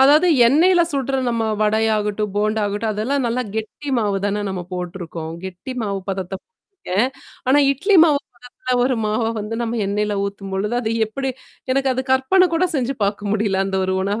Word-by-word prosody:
அதாவது 295 +6 +6 0.2
எண்ணெய்ல 345 +7 +5
சுட்ற 270 -1 0
நம்ம 230 -1 0 0.2
வடையாகட்டும், 210 -1 +1
போண்டா 215 +1 +1
ஆகட்டும், 210 +2 -2
அதெல்லாம் 250 +6 -1
நல்லா 245 +2 0
கெட்டி 220 +7 -5
மாவு 205 -3 0
தான 205 +1 -1
நம்ம 185 -2 -3
போட்டுருக்கோம். 175 -3 -5
கெட்டி 190 +7 -7
மாவு 200 -2 -2
பதத்த 190 -1 -3
போட்ருக்கேன். 260 - -3 0.4
ஆனா, 275 +3 +5
இட்லி 385 +9 +2
மாவு 295 -3 +3 0.2
பதத்தல 250 +1 -4
ஒரு 255 0 +1
மாவ 215 +2 0 0.2
வந்து 210 +2 -4
நம்ம 235 0 -2
எண்ணெய்ல 205 0 -1
ஊத்தும்பொழுது, 200 +2 -3
அது 220 - -2 0.2
எப்படி 265 +5 -3 0.4
எனக்கு 270 0 +1
அது 260 - -2
கற்பனை 355 +9 +4
கூட 365 +2 +3
செஞ்சு 270 +1 -1
பார்க்க 205 0 -2
முடியல, 205 -3 +1
அந்த 195 0 -1
ஒரு 190 - 0
உணவ. 205 +3 -1
220 Hz, 170 wpm, -20 LUFS, 200-265 Hz, 0.4 s, அதாவது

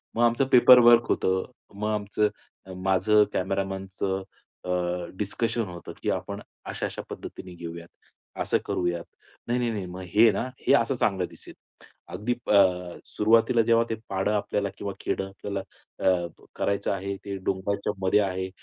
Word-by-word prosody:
मग 120 - +2
आमचं 120 +3 +3
पेपरवर्क 120 -2 +8
होतं. 95 0 +1 0.3
मग 105 +1 -2
आमचं 105 0 0 0.5
माझं 95 +3 +4
कॅमेरामनचं 95 0 -2 0.4
अ, - - -5 0.5
डिस्कशन 115 +3 -1
होतं, 85 -1 -9
की - - 0
"आपण - - -4 0.3
अशा-अशा - - -4
पद्धतीने 90 -1 -8
घेऊयात. 85 0 -8 0.5
असं - - +2
करूयात. 85 -1 -1 0.4
नाही, 120 +1 +1
नाही, 120 -1 0
नाही. 100 -4 -3
मग 90 +1 -8
हे 110 +1 +7
ना? - - -1 0.2
हे - - +6
असं 130 +1 +2
चांगलं 95 -6 +1
दिसेल." - - -14 0.6
अगदी 105 +7 -1
प - - -8 0.6
सुरुवातीला 115 +2 +3
जेव्हा 115 0 +5
ते 115 - -1
पाडं 95 +2 0
आपल्याला 100 -1 -1
किंवा 100 -1 -4
खेडं 95 - -2
आपल्याला, 100 +1 -5 0.4
अ, 90 -2 +2 0.3
करायचं 100 0 0
आहे, 100 +1 -3
ते 100 -1 -4
डोंगराच्यामध्ये 100 0 0
आहे, 95 -1 -2
100 Hz, 140 wpm, -26 LUFS, 95-115 Hz, 0.6 s, पेपरवर्क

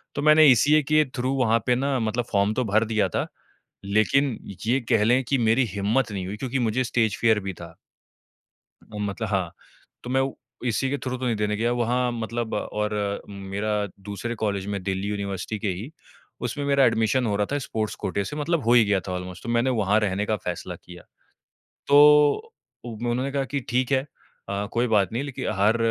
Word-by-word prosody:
तो - - -2
मैंने 155 +1 +6
ईसीए 150 +5 +4
के 155 +2 +3
थ्रू 130 +1 -1
वहाँ 115 -3 +3
पे 125 - +3
ना 135 +2 0
मतलब 115 +1 -1
फॉर्म 100 0 +2
तो 125 - 0
भर 110 +2 +2
दिया 110 -1 +1
था, - - -2 0.6
लेकिन 110 +6 +2 0.3
ये 125 +4 +3
कह 115 -4 +4
लें 125 +4 +3
कि 135 +3 0
मेरी 125 +3 +3
हिम्मत 105 +5 0
नहीं 95 -3 -4
हुई 100 +3 -5
क्योंकि 130 +3 -2
मुझे 120 +1 +1
स्टेज 110 -4 0
फियर 110 -2 +4
भी 95 0 -4
था। 85 -1 -11 1.1
अ, 105 - -11
मतलब 105 +2 -3
हाँ। 95 -5 -1 0.5
तो 125 - -7
मैं 130 +1 +2
वो 135 0 -3 0.3
इसी 125 +3 0
के 145 - -1
थ्रू 130 -2 -4
तो 130 - -4
नहीं 120 -2 +1
देने 105 0 -1
गया 115 +2 +1
वहाँ 120 +1 0
मतलब 115 0 -4
और 105 0 -2 0.4
मेरा 100 +1 -4 0.4
दूसरे 110 +4 -4
कॉलेज 100 -4 -2
में, 100 -1 -3
दिल्ली 95 +1 -2
यूनिवर्सिटी 100 0 -4
के 110 - -2
ही, 100 - -4 0.5
उसमें 125 +4 -3
मेरा 140 -1 +4
एडमिशन 115 +3 +2
हो 105 -2 0
रहा 105 0 +1
था, 145 - +1
स्पोर्ट्स 110 -5 -3
कोटे 100 - -1
से, 105 - -6
मतलब 155 +1 -1
हो 120 - +4
ही 120 -2 +6
गया 100 -1 +2
था - - -3
ऑलमोस्ट। 90 0 -6
तो - - -5
मैंने 120 +2 +2
वहाँ 105 +2 +3
रहने 100 -1 -1
का 110 - 0
फ़ैसला 90 0 -4
किया। 90 0 -12 0.9
तो 150 - +6 0.3
उ 120 -2 -6
उन्होंने 125 +3 -1
कहा 140 -1 0
कि, 140 +1 -3
"ठीक 125 +2 0
है 135 +1 +1 0.4
अ, 100 +1 -2
कोई 120 +1 +1
बात 105 -4 +2
नहीं। 120 +4 -1
लेकिन 140 -3 -5
हर 105 +3 +4
115 Hz, 205 wpm, -24 LUFS, 100-130 Hz, 1.1 s, मैंने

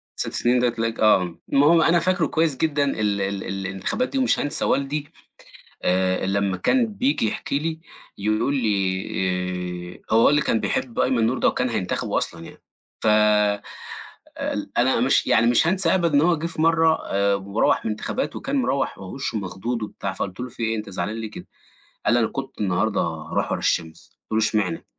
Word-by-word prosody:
6 - - -3
سنين 125 +1 +2
ده 125 0 +3
تلاقيك 115 -1 -3
آه 90 -5 +3 0.2
المهم 150 +4 +5
أنا 170 +2 +4
فاكره 185 +2 +1
كويّس 160 -4 0
جدًا 150 -3 +1
ال 105 -6 0
ال 95 0 -2
الانتخابات 95 - -2
دي 275 - -3
ومش 260 - +2
هانسى 145 - 0
والدي 140 +2 0 0.8
آآ 95 +1 +1
لمّا 100 -1 0
كان 245 - +2
بييجي 220 - 0
يحكي 140 - -2
لي 160 +1 -3 0.4
يقول 110 +7 0
لي 90 -4 -2
آآ، - - +2
هو 115 - +6
والدي 150 +1 +4
كان 110 - +1
بيحب 120 -3 -2
أيمن 120 -3 +2
نور 125 +2 0
ده، - - +3
وكان 125 - 0
هينتخبه 95 -5 -1
أصلًا 85 0 -4
يعني - - -13 0.4
ف - - -3 1.4
ل - - -3
أنا - - +3
مش - - +3
يعني 115 +1 +4
مش 120 +6 +4
هانسى 185 -1 +3
أبدَا 170 -5 +1
إن 140 - +6
هو 170 +1 +3
جِه 165 - -3
في 160 -1 -3
مرّة 165 -1 +4
آآ 100 0 +1
مروّح 100 +3 0
من 110 - -1
الانتخابات، 250 - -3
وكان 275 +1 -3
مروّح 140 - 0
وهو 95 -1 -8
وشّه 135 -5 -3
مخضوض 105 +5 -4
وبتاع 100 -2 -4
فقُلت 95 +3 -5
له: 125 - -4
"في 115 - -9
إيه 115 0 0
أنت 105 -1 -6
زعلان 105 +3 -3
ليه 110 -1 -5
كده؟" - - -10 0.6
قال - - +3
لي: 120 - +4
"أنا 110 - +2
كنت 135 -4 -7
النهارده 100 +2 +1
هاروح 80 -2 -2
ورا - - -1
الشمس" 80 -1 -2
قُلت 110 0 +2
له: 110 - +3 0.2
"إشمعنى؟" 90 - -5
115 Hz, 190 wpm, -23 LUFS, 95-150 Hz, 1.4 s, هو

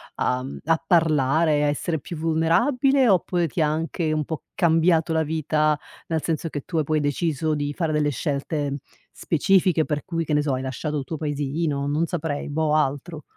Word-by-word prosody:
uhm, 130 +2 -2
a 165 +1 +1
parlare, 155 -2 +3
a - - +2
essere 150 +2 -1
più 170 - -8
vulnerabile, 190 - +2
oppure 175 -2 +2
ti 160 +2 -2
anche 155 +1 0
un 155 -1 0
po' 160 +1 -5
cambiato 165 -1 +3
la 160 0 +2
vita 155 -1 +1 0.3
nel 160 -1 -1
senso 165 0 -1
che 145 -3 -4
tu 165 - -5
ha 155 - +2
poi 155 +1 0
deciso 155 +1 0
di 145 -1 -2
fare 165 -2 -1
delle 150 -1 +1
scelte 140 +1 -2 0.3
specifiche 180 0 +2
per 150 -1 -3
cui, 165 -2 -2
che 155 - -6
ne 150 - +3
so, 145 -2 -1
hai 130 - -2
lasciato 150 +3 -3
il - - -4
tuo 160 +4 -5
paesino, 145 0 -2
non 150 +3 +1
saprei, 160 -4 -3
boh 155 +1 0
altro? 150 +1 -1
155 Hz, 185 wpm, -24 LUFS, 145-165 Hz, 0.3 s, parlare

